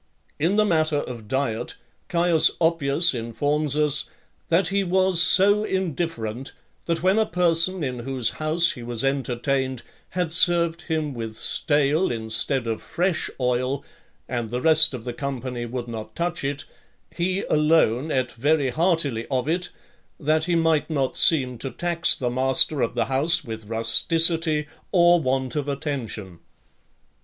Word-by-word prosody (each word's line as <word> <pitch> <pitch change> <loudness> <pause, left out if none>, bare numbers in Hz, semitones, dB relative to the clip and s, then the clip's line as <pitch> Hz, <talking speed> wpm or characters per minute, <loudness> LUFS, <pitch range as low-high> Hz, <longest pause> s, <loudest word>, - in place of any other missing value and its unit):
In 170 +7 +1
the 215 0 +3
matter 155 -5 +1
of 120 -6 -6
diet, 130 -3 -2 0.3
Caius 170 -2 +4
Oppius 165 0 +2
informs 145 +6 -2
us, 150 -1 +2 0.4
"that 170 +1 +2
he 200 0 0
was 185 -1 +3
so 200 +4 +6
indifferent, 160 - -3 0.3
that 170 0 -2
when 190 +4 +3
a 220 - +2
person 175 0 +1
in 125 -3 -4
whose 125 -1 -1
house 165 +2 +2
he 125 - -10
was 120 0 -4
entertained, 130 -1 -2 0.3
had 175 -3 -1
served 170 0 +3
him 155 -3 -2
with 115 -2 -6
stale, 150 +7 +1
instead 120 +3 -1
of 115 -1 -3
fresh, 180 -1 -2
oil, 125 +2 -1 0.4
and 120 -3 -4
the 125 +2 -3
rest 155 0 +5
of 120 - -8
the 120 0 -5
company 125 -2 -5
would 120 0 -5
not 110 -2 -8
touch 170 -1 -3
it, 140 +2 -4 0.5
he 185 +3 -1
alone 150 -3 +2
ate 130 -3 -1
very 140 +2 0
heartily 155 -7 0
of 130 -1 -1
it, 175 +3 -1 0.5
that 155 +1 +1
he 175 -1 0
might 160 -2 +1
not 140 -4 -1
seem 130 -7 +3
to 135 - -3
tax 170 +3 0
the 125 -2 -3
master 130 +3 +3
of 115 - -1
the - - 0
house 155 +5 +2
with 110 -4 -8
rusticity 155 +8 +1 0.2
or 175 -1 +5
want 130 -1 -2
of 145 -1 -2
attention." 130 - -5
145 Hz, 150 wpm, -23 LUFS, 125-165 Hz, 0.5 s, so